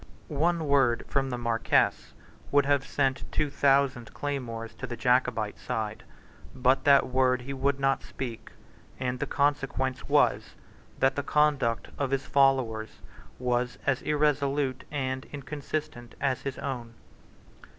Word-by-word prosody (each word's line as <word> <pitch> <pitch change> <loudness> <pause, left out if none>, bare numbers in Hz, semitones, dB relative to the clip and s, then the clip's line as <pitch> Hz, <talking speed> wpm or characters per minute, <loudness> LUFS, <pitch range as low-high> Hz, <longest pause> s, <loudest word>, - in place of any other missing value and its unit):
One 165 +2 +1
word 135 -4 +3
from 135 -1 0
the 125 - -3
Marquess 115 -1 +1 0.4
would 145 -1 +4
have 140 -1 +1
sent 135 -1 -1
two 150 -2 0
thousand 135 -4 +2
claymores 115 -6 -4
to 135 - -4
the 120 -1 -6
Jacobite 125 -4 +1
side. 110 -1 -3 0.5
But 130 +1 +2
that 140 -1 +6
word 130 -1 +2
he 135 +3 -6
would 135 +1 0
not 135 0 +2
speak; 120 -4 -7 0.5
and 125 -1 -2
the - - -2
consequence 135 -2 -1
was, - - +2 0.4
that 135 +1 +2
the 145 - 0
conduct 140 -5 +1
of 140 -2 0
his 135 0 -1
followers 130 -6 +1 0.4
was 125 0 -1
as 135 -3 +1
irresolute 145 -3 0
and 130 -2 -3
inconsistent 145 -3 -5
as 135 -2 0
his 140 -2 -4
own. 120 -4 -5
135 Hz, 135 wpm, -28 LUFS, 125-140 Hz, 0.5 s, that